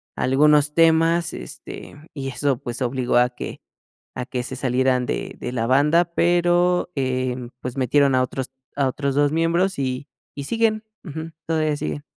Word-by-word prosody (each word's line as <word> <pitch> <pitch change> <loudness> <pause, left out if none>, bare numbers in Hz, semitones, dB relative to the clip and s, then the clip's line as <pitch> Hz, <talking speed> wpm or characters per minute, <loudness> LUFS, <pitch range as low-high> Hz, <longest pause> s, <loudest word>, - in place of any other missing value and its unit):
algunos 150 +3 +3
temas, 165 +1 +3
este, 60 - -9
y 135 -2 -4
eso, 135 0 0
pues, 120 +2 -6
obligó 125 -1 +1
a 125 0 +4
que 125 - -8 0.5
a 125 - -4
que 125 -1 -4
se 130 - -5
salieran 130 0 +1
de - - -3
de 125 - -3
la 115 -2 -1
banda, 150 +7 +4
pero, 175 +1 +2
em, 130 -2 -2
pues, 125 0 -6
metieron 135 +1 +3
a 130 - +4
otros 130 +1 -3 0.3
a 140 -1 +2
otros 140 +1 -1
2 145 0 +3
miembros, 170 +1 +1
y 130 +1 -2 0.3
y 140 - -5
siguen, 225 +2 +1 0.2
ujú, 160 -1 -7
todavía 155 -2 +1
sigue. 75 - -4
140 Hz, 165 wpm, -22 LUFS, 125-160 Hz, 0.5 s, a